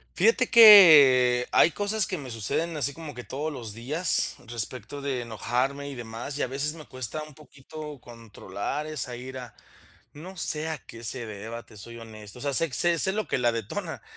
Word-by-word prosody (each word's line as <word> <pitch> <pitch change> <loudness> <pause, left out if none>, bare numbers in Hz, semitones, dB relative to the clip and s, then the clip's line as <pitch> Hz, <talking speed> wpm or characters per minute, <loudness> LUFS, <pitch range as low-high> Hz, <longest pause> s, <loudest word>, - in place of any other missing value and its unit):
Fíjate 460 - +2
que, 145 - +8
hay - - +5
cosas 205 +4 0
que 185 - -4
me 135 -4 -8
suceden 155 +10 -2
así 140 -1 -1
como 155 -1 -9
que 125 - -8
todos 150 +5 -5
los 120 -6 -6
días, 150 - -1
respecto 120 +5 -3
de 140 -3 -3
enojarme 125 +5 -3
y - - -7
demás, 120 +3 -7
y - - -2
a - - -1
veces 140 +4 -2
me 155 -3 -12
cuesta 130 +4 -4
un 150 -1 -12
poquito 150 0 -11
controlar 115 +3 -7
esa 140 -5 -4
ira. 125 -2 -9 0.6
No 180 +6 -11
sé 155 0 0
a 155 - -4
qué 115 -1 -12
se 120 +1 -2
deba, 110 +3 -8
te 110 - -17
soy 115 +4 -10
honesto, 110 -1 -11
o - - -8
sea 140 -1 -1
sé 165 +4 +1
sé 170 +6 +2
sé 190 - +2
lo 215 +2 -3
que - - -1
la 120 -1 +2
detona, 115 -3 -5
135 Hz, 195 wpm, -26 LUFS, 115-155 Hz, 0.6 s, que